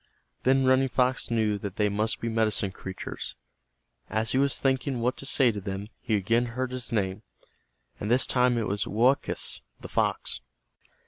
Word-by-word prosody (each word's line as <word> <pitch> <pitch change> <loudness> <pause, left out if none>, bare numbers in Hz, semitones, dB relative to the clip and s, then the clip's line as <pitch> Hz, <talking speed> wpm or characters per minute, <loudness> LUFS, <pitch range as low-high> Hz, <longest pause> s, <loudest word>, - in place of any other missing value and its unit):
Then 135 +1 +3
Running 130 +1 +4
Fox 125 0 +1
knew 110 -3 +1
that 100 -1 -5
they 105 -2 +2
must 105 +2 -1
be 115 - -2
medicine 110 -3 0
creatures. 95 0 -6 0.7
As 110 +1 0
he 130 - +2
was 140 0 +2
thinking 130 -1 0
what 125 +2 +1
to 135 - -5
say 130 -3 +4
to 105 -2 -5
them, 100 +1 -5
he 115 -4 0
again 115 +5 +2
heard 130 0 -1
his 130 -1 -4
name, 100 -2 -1 0.8
and 105 - -3
this 125 +2 +5
time 125 -1 +3
it 115 - 0
was 100 0 -1
Woakus, 125 +6 +1 0.2
the - - -8
fox. - - 0
115 Hz, 175 wpm, -27 LUFS, 105-130 Hz, 0.8 s, this